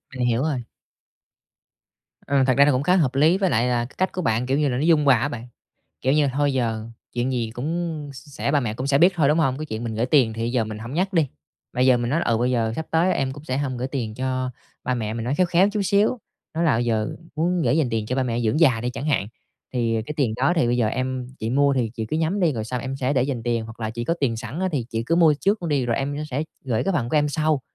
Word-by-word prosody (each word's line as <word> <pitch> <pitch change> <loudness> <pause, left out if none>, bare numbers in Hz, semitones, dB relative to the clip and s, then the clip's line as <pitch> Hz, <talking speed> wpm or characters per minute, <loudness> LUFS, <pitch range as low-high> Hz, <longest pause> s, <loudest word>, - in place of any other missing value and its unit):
Mình 125 -1 0
hiểu 120 +1 +1
rồi. 145 -6 -1 1.6
Ừ, 140 -1 +3
thật 130 - +4
ra 140 - +7
là 145 - +4
cũng 130 +1 0
khá 180 +5 +3
hợp 145 -8 +1
lý 155 +7 +4
với 190 -2 +1
lại 120 -1 +2
là, 125 - +1
à, - - -2
cái 125 - -15
cách 185 - +1
của 185 - -2
bạn, 120 -6 0
kiểu 135 +2 +1
như 150 -2 +2
là, 125 - -1
nó 135 - -1
dung 160 -3 +4
hòa 135 -3 +6
á 120 - 0
bạn. 120 +1 -7 0.5
Kiểu 130 - +1
như, 150 -1 +3
thôi 145 +1 +1
giờ 115 -4 -1 0.3
chuyện 120 +2 -1
gì 120 -3 -1
cũng 155 +2 -3
s 135 - -13
sẽ - - -1
ba 145 0 +3
mẹ 110 -4 -2
cũng 130 +3 -4
sẽ 140 0 +3
biết 175 +4 +6
thôi, 155 -5 +2
đúng 150 +3 +3
hông? 135 -4 +1
Cái 155 - -5
chuyện 110 -3 -5
mình 115 -1 -3
gửi 115 +3 0
tiền 130 -5 +3
thì 115 +1 -2
giờ 120 -2 +1
mình 110 -1 -6
hổng 115 +5 -7
nhắc 190 +4 0
đi. 165 -4 +3 0.5
Mà 125 - -3
giờ 130 -1 +5
mình 120 0 -2
nói: 165 +5 +1
"Ừ, 115 - +1
bây 125 +2 +1
giờ 115 -3 0
sắp 160 - -4
tới 165 +3 +3
em 135 -1 -1
cũng 145 +2 -11
sẽ 130 -3 -2
hông 135 -3 -2
gửi 125 +2 -3
tiền 120 -6 -3
cho 130 +1 -2 0.3
ba 125 - 0
mẹ", 110 -3 -3
mình 115 0 -4
nói 125 - 0
khéo 180 +4 +2
khéo 180 +3 +4
chút 210 0 -2
xíu. 205 +5 +2 0.4
Nói 165 +2 0
là 150 -8 +3
giờ 115 -3 0 0.3
muốn 175 +2 +1
gửi - - +2
dành 155 -6 +2
tiền 110 -2 -1
cho 125 - -2
ba 135 - +2
mẹ 120 -2 -1
dưỡng 115 +6 +1
già 130 -9 +4
đi 120 +2 -2
chẳng 125 +4 -5
hạn, 140 -9 +1 0.5
thì 115 -3 0
,à, - - 0
"Cái 150 - -5
tiền 130 -8 +1
đó 130 +7 +2
thì 160 - +3
bây 120 +1 +1
giờ 120 -3 +2
em 130 +2 -2
chị 110 - -3
mua 140 +2 +3
thì 120 -4 0
chị 110 -2 -4
cứ 155 - -2
nhắm 165 +5 0
đi 170 -4 +3
rồi 110 -4 -3
xong 125 +2 -3
em 135 +2 -4
sẽ 135 +1 0
để 130 - +2
dành 130 -3 -2
tiền, 115 -1 -1
hoặc 110 +1 -11
là 110 -1 -2
chị 120 +1 -4
có 170 - +1
tiền 120 -5 +1
sẵn 120 +8 -6
á, 190 - +1
thì 125 -6 -1
chị 115 0 -2
cứ 165 - +2
mua 165 -3 +5
trước 200 -1 +1
luôn 170 - -2
đi 140 -5 +1
rồi 115 - 0
em 140 +1 -2
sẽ 135 +3 -1 0.2
gửi 120 -4 0
cái 195 - +1
phần 135 -9 0
của 155 - 0
em 150 0 +3
sau. 155 0 +1
130 Hz, 305 wpm, -23 LUFS, 120-155 Hz, 1.6 s, ra